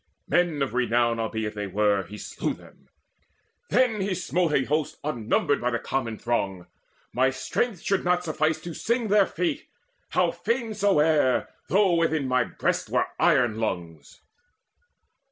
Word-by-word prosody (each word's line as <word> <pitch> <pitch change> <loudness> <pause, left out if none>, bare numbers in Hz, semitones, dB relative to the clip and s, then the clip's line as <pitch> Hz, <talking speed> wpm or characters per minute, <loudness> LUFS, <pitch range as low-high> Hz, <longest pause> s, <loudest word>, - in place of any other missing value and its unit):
Men 165 -3 +2
of 135 - -3
renown 120 -1 +1
Albeit 110 -1 -2
they 105 -1 -4
were, 100 0 +2
he 105 +2 -10
slew - - -3
them. - - -19 0.8
Then 235 -5 +2
he 190 -1 -1
smote 180 -2 0
A 140 - +2
host 150 +2 -1
unnumbered 140 -1 0
of 125 0 0
the - - +2
common 115 -2 -3
throng. 100 -7 -2 0.5
My 130 +2 +3
strength 165 - -2
should 195 -1 0
not 180 0 +1
suffice 155 -1 0
to 170 - -6
sing 235 +5 -1
their 205 -1 +5
fate, 315 -4 -2 0.4
How - - +2
fain 230 -2 -2
soever, 160 -10 +3 0.2
though 195 -1 +3
within 160 -4 +1
my 130 -1 +2
breast - - -2
Were - - +1
iron 115 -3 +3
lungs. 85 -8 -5
145 Hz, 150 wpm, -26 LUFS, 115-180 Hz, 0.8 s, their